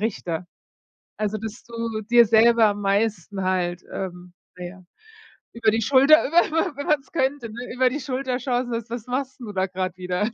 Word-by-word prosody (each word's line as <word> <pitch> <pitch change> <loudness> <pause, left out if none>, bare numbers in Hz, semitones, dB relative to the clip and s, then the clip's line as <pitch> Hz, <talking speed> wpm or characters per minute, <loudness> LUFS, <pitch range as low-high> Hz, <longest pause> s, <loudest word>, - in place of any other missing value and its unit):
Richter. 180 -6 -3 0.7
Also, 215 0 -1
dass 220 +3 -7
du 230 -2 -4
dir 235 +2 +5
selber 225 +1 +5
am 205 -1 0
meisten 200 -1 -1
halt, 180 -1 -1
ähm, 180 -1 -6 0.2
na 180 - -6
ja, 185 +1 -10 0.7
über 230 -1 +2
die 225 +1 0
Schulter 280 +6 +6
über 340 +4 +5
über 320 -3 -1
wenn 285 - -5
man's 290 -3 0
könnte, 270 -5 -1
ne, 240 +3 -7
über 255 0 +3
die 280 +4 -4
Schulter 260 -1 -2
schaust 250 -1 -1
und 240 - -6
sagst: 230 0 -4
„Was 235 -1 -5
machst 260 +1 -3
'n 240 - -7
du 210 - -6
da 190 -1 0
grad 185 -1 -4
wieder? 180 +4 -2
225 Hz, 195 wpm, -23 LUFS, 195-255 Hz, 0.7 s, Schulter